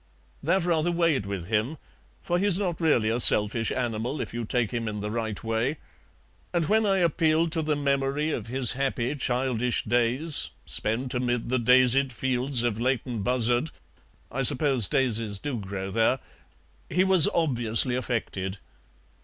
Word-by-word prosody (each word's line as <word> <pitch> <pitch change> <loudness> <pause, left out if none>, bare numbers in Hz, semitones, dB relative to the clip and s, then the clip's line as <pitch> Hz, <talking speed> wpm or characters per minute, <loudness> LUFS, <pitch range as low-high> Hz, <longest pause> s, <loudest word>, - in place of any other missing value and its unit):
That 190 -1 +1
rather 170 -1 +1
weighed 165 - 0
with 100 -4 -5
him, 110 - -1 0.5
for 175 0 -1
he's 195 -2 +4
not 180 -5 -3
really 120 -9 +2
a 115 +2 -1
selfish 110 0 +4
animal, 120 +2 -3
if - - -5
you 120 -1 -4
take 120 -1 -1
him 115 -1 -3
in 105 -1 -4
the 105 +1 -4
right 110 -2 -4
way, 115 +6 -1 0.7
and 170 -2 0
when 220 +2 +2
I 195 -1 +2
appealed 165 -1 +1
to 160 - -1
the 155 -1 -1
memory 140 +1 -1
of - - -4
his 125 0 0
happy 135 -1 -2
childish 125 -3 -1
days, 125 +6 0 0.2
spent 125 +5 -2
amid 125 -2 -2
the 130 0 +1
daisied 130 +2 +4
fields 130 +1 +1
of 115 -3 -1
Leighton 125 -2 -2
Buzzard 120 +5 +1 0.6
(I 135 - -3
suppose 135 -4 +3
daisies 115 -5 0
do 130 +2 -4
grow 95 -1 -6
there), 115 +4 +2 0.7
he 180 +6 +2
was 190 -4 +6
obviously 125 -6 +2
affected. 105 -6 -3
125 Hz, 155 wpm, -26 LUFS, 115-150 Hz, 0.7 s, was